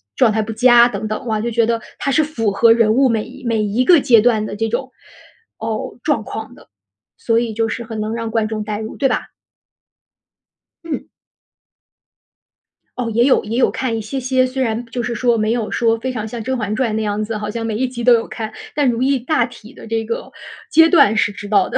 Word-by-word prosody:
状 250 -4 +4
态 220 +1 0
不 220 +1 -4
佳 240 +1 +6
等 220 -3 -4
等。 215 - -4
哇， 215 -1 -1
就 235 +2 -2
觉 230 0 +2
得 230 0 -1 0.2
她 - - -1
是 310 +3 +3
符 230 -9 -1
合 230 +3 +5
人 225 -2 +4
物 265 +2 +4
每 225 -2 0
一 260 +1 -13
每 230 -2 +1
一 210 +4 0
个 345 +3 +6
阶 235 -5 +5
段 220 -2 +2
的 205 - -6
这 225 +2 -1
种 255 +3 -3 0.7
哦， 220 0 -4
状 295 -8 0
况 220 +2 -7
的。 - - -18 0.5
所 230 -1 +2
以 235 -2 -2
就 225 +1 0
是 230 +1 -4
很 225 -1 -6
能 215 +1 -2
让 230 -1 -3
观 225 -1 0
众 215 -1 -4
带 210 0 -4
入， 220 0 -6
对 270 - +1
吧？ - - -2 1.6
嗯。 330 -3 -5 1.9
哦， 240 -2 -2
也 235 +2 +3
有 270 - +3
也 225 +3 -3
有 - - +4
看 255 -3 -2
一 225 - -3
些 220 +6 -4
些， 260 0 +1
虽 260 +1 -4
然 230 0 -2
就 240 +1 -4
是 240 - -2
说 235 +1 +1
没 215 0 0
有 230 -2 -1
说 230 -1 +1
非 260 +3 -3
常 220 -3 -4
像 230 +1 -6
《甄 260 +3 -2
嬛 210 -2 -2
传》 240 -1 0
那 220 - -1
样 210 0 -1
子， 215 0 -4
好 210 0 -5
像 225 +2 -4
每 225 -1 -2
一 260 +4 0
集 245 -1 -6
都 245 +1 +6
有 230 - -2
看， 220 -2 -6 0.2
但 285 -3 +2
如 240 +1 0
懿 270 0 +2
大 245 0 +1
体 235 -2 -13
的 - - -13
这 225 0 -2
个 230 +1 -5 0.4
阶 325 0 +6
段 220 - +5
是 205 -1 +2
知 205 0 -9
道 200 -2 +2
的。 - - 0
230 Hz, 255 characters per minute, -18 LUFS, 220-250 Hz, 1.9 s, 佳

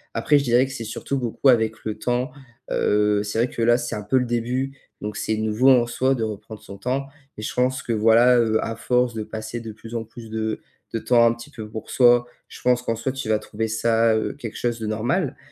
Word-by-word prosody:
Après, 150 -1 +3
je - - -2
dirais 125 +1 +4
que 135 - -8
c'est 115 -4 -5
surtout 120 +5 -3
beaucoup 125 +1 -1
avec 110 -3 +3
le 110 -1 -3
temps, 125 +5 -1 0.4
heu, 105 0 +2
c'est 105 +1 -4
vrai 120 +1 +2
que 115 - -5
là, 120 +1 +5
c'est 120 -1 -4
un 105 - -4
peu 105 +6 +1
le 125 - +2
début. 125 +3 -2 0.2
Donc 105 0 -5
c'est 110 +1 -1
nouveau 110 +4 +3
en 120 -2 +4
soi 130 +2 +1
de 115 - -2
reprendre 110 0 -6
son 100 0 -10
temps 130 +6 -2 0.3
et - - -6
je 105 - -4
pense 130 +1 +1
que 115 - -2
voilà, 115 +3 +5
heu, 110 -2 +2
à 115 - -3
force 125 +1 +1
de 110 -1 -4
passer 110 +2 -6
de 110 -1 -7
plus 115 +2 -10
en 115 - -2
plus 115 0 -12
de 110 0 -2 0.3
de 115 - 0
temps 120 0 +4
un 115 - +4
petit 115 0 -11
peu 110 -2 -9
pour 110 +1 -7
soi, 120 -1 +5 0.2
je - - -11
pense 125 0 +3
qu'en 115 -2 -2
soi 130 +3 -2
tu 135 -5 -5
vas 110 -1 +3
trouver 110 +1 -4
ça, 115 +1 +2
heu, 110 - -2
quelque 120 -6 -7
chose 120 -1 -1
de 110 - -4
normal. 125 - -1
115 Hz, 250 wpm, -23 LUFS, 110-125 Hz, 0.4 s, là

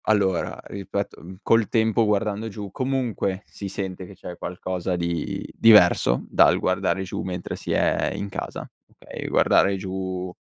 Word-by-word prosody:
Allora, 100 -5 +1
ripeto, 100 0 -5
mhmm, 90 +3 -10
col 115 -2 +3
tempo 110 0 +2
guardando 105 +1 0
giù 105 -2 -7
comunque 120 -6 -1
si 100 - -8
sente 95 -1 -5
che 100 - -12
c'è 90 -1 -8
qualcosa 90 +1 -3
di 85 -1 -3
diverso 90 - +6
dal - - +5
guardare 95 - 0
giù, 95 - -4
mentre 90 -1 -4
si - - -6
è - - +1
in 100 - -4
casa, 100 - -6 0.2
okay, - - -9
guardare 100 - +4
giù 95 -1 -4
95 Hz, 150 wpm, -24 LUFS, 90-105 Hz, 0.2 s, diverso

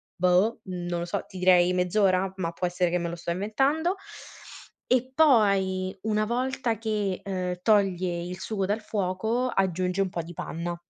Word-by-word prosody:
boh, 180 +5 +2
non 175 -2 -4
lo 170 - -3
so, 175 - -3
ti 190 - -11
direi 180 -1 +5
mezz'ora, 185 +1 +2
ma 170 -2 -2
può 180 - -3
essere 180 0 0
che 180 - +1
me 170 0 -2
lo 170 - -5
sto 170 0 -4
inventando. 270 - 0 0.9
E 255 +1 +1
poi 195 -9 +3
una 215 -1 +1
volta 245 0 -1
che, 210 -4 -2
ehm, 180 -2 -3
toglie 185 -5 +2
il 180 +1 -6
sugo 195 -1 -2
dal 210 +2 -1
fuoco, 215 +5 -1
aggiunge 185 0 0
un 190 - 0
po' 170 - -3
di 170 +2 -10
panna. 170 +1 -5
190 Hz, 170 wpm, -26 LUFS, 180-215 Hz, 0.9 s, direi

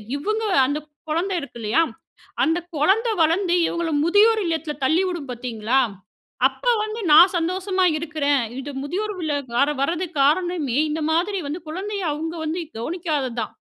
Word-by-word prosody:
இவுங்க 430 +10 -2 0.2
அந்த 285 +3 -1 0.3
குழந்தை 355 +5 0
இருக்கு 280 - -10
இல்லையா, 220 +7 +1 0.6
அந்த 325 +2 +2 0.2
கொழந்தை 390 +11 +2
வளர்ந்து 345 +3 +2
இவுங்கள 340 -1 -2
முதியோர் 425 +5 +4
இல்லத்ல 325 -2 -2
தள்ளிவுடும் 340 -1 0
பாத்தீங்களா, 240 0 -1 0.7
அப்போ - - -1
வந்து 435 +1 -5
நான் 340 +5 +8
சந்தோஷமா 370 +2 0
இருக்குறேன். 295 -4 0 0.2
இது 280 +2 -6
முதியோர் 400 +9 -3
இல்லம் 315 -3 -1 0.2
கார 275 +4 +3
வரதுக்க்கு 330 +1 -2
காரணமே 305 -3 +1
இந்த 310 +1 -2
மாதிரி 375 +5 +1
வந்து 305 +5 -4
குழந்தைய 395 +4 -4
அவுங்க 320 +3 -4
வந்து 325 +3 -2 0.2
கவனிக்காதது 295 -2 -2
தான். - - -4
325 Hz, 140 wpm, -22 LUFS, 290-370 Hz, 0.7 s, நான்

